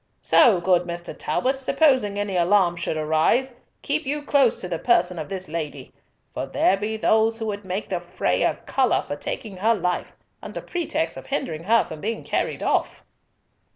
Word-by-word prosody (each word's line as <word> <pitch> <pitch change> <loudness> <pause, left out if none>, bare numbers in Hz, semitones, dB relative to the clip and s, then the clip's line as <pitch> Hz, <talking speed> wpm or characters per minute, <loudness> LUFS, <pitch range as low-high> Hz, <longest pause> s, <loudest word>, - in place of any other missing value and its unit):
So, 205 -7 +5
good 180 0 +2
Mr. 175 0 -6
Talbot, 260 +2 0
supposing 260 -6 +2
any 205 -2 -2
alarm 175 0 +3
should 170 -2 -3
arise, 160 +12 +1 0.3
keep 300 +3 0
you 295 +1 -2
close 275 -5 +3
to 180 - -4
the 170 -2 -3
person 180 -7 +2
of 155 - -6
this 190 -1 -4
lady, 150 -4 -6 0.4
for - - -4
there 190 - +2
be 210 +2 -3
those 220 +1 +2
who 225 - -4
would 205 -2 -4
make 190 +3 -4
the 180 -2 -2
fray 175 +1 -1
a - - +2
colour 260 -3 +1
for 145 - -5
taking 195 +6 -5
her 225 +5 +2
life, 180 -3 -2 0.3
under - - -6
pretext 325 -2 -2
of - - -10
hindering 165 - -3
her 230 +3 +4
from 155 -1 -9
being 225 +2 -3
carried - - -2
off." - - 0
200 Hz, 185 wpm, -23 LUFS, 175-235 Hz, 0.4 s, So